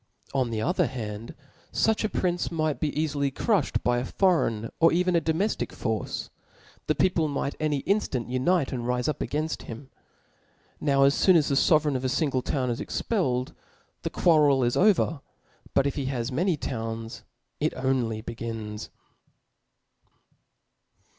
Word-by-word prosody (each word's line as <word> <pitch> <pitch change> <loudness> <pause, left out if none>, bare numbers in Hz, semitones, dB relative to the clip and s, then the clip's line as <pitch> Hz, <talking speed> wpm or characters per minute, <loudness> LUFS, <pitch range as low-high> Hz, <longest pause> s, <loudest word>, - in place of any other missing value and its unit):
On 130 -3 +1
the 110 -1 -2
other 180 - +2
hand, 110 -3 -6 0.4
fuch 220 0 +2
a 215 - +1
prince 175 -3 -1
might 155 -3 -1
bceafily 150 -2 0
crufhed 210 - 0
by 120 0 +2
a - - -2
foreign 130 - +1
or 165 - +6
even 180 +1 +2
a 170 - +3
domeftic 165 +7 -1
force; 110 -4 -3 0.6
the 155 - +2
people 170 -1 +2
might 140 -1 -2
every 150 -3 0
inftant 185 - 0
unite 135 +5 +1
and 120 -2 -3
rife 125 +1 0
up 155 - -1
againft 155 +2 -2
him. 125 +4 -9 0.9
Now 140 -2 +3
as 140 +1 +3
foon 185 - +6
as 155 -3 +3
the 140 - +1
fovereign 150 0 +3
of 130 - -2
a 130 - 0
fingle 135 -2 0
town 130 -3 -1
is 115 - -3
expelled, 130 - -1 0.5
the - - -2
quarrel 150 -6 +4
is 120 0 +1
over; 180 -7 +3 0.5
but 135 - +4
if 140 - 0
he 140 -2 -3
has 130 -1 -2
many 170 +5 +1
towns, 115 -3 -5 0.4
it - - 0
only 130 -4 0
begins. 115 -2 -6
140 Hz, 155 wpm, -26 LUFS, 125-160 Hz, 0.9 s, or